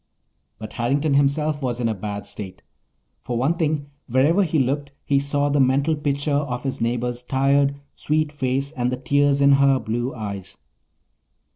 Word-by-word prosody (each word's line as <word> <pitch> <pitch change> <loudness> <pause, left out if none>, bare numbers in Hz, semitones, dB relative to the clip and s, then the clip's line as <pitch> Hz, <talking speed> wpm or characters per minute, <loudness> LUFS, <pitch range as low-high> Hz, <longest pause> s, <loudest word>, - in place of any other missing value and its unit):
But 110 +1 -8
Harrington 140 +5 0
himself 145 +2 +1
was 125 -2 -2
in 120 - 0
a 110 - 0
bad 105 0 -5
state. 95 -3 -8 0.6
For 120 - -3
one 135 +7 +2
thing, 155 -3 -1 0.2
wherever 140 +9 +3
he 165 -4 +1
looked 140 +1 0
he 140 -1 +2
saw 145 +1 0
the 145 0 +1
mental 140 +4 +3
picture 145 0 -2
of 130 -4 -1
his 135 -3 -3
neighbour's 120 +1 -1
tired, 140 +2 +2 0.2
sweet 155 0 0
face 135 -1 -1
and 125 -4 -1
the 125 - -2
tears 140 +1 +2
in 140 0 +6
her 140 -1 +5
blue 120 +3 -2
eyes. 100 -4 -6
140 Hz, 165 wpm, -22 LUFS, 125-145 Hz, 0.6 s, in